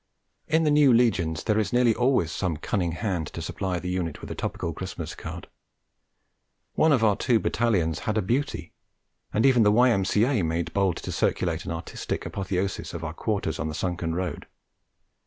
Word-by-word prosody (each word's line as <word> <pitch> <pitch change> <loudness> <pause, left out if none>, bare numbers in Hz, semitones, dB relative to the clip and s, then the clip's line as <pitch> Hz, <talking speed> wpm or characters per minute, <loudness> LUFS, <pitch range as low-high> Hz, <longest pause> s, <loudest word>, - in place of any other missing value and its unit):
In 160 +1 +2
the 150 - +3
new 145 -2 +6
legions 95 -10 +2
there 110 0 +2
is 110 - -1
nearly 120 -2 +4
always 125 - +2
some 85 -4 -2
cunning 85 0 -1
hand 90 -5 -2
to - - -6
supply 95 -2 -3
the 90 +1 -4
unit 85 -4 -2
with - - -8
a - - -2
topical 85 - -3
Christmas 85 -3 -6
card: 80 +1 -8 1.3
one 160 - +3
of 130 -6 +3
our 105 -2 +4
two 115 +2 +2
Battalions 100 -9 +1
had 110 0 -2
a 110 - +1
beauty, 130 +9 -2 0.6
and 110 - +2
even 130 -3 +5
the 105 -1 +5
Y.M.C.A. 115 +1 +3
made 85 0 -2
bold 95 -4 +1
to - - -5
circulate 85 -3 0
an - - -4
artistic 80 0 -4
apotheosis 95 -2 -3
of 85 - -5
our 80 -1 -4
quarters 95 -5 -2
on - - -1
the 75 - -4
sunken 85 -2 -2
road. 90 -4 -4
95 Hz, 180 wpm, -26 LUFS, 85-115 Hz, 1.3 s, new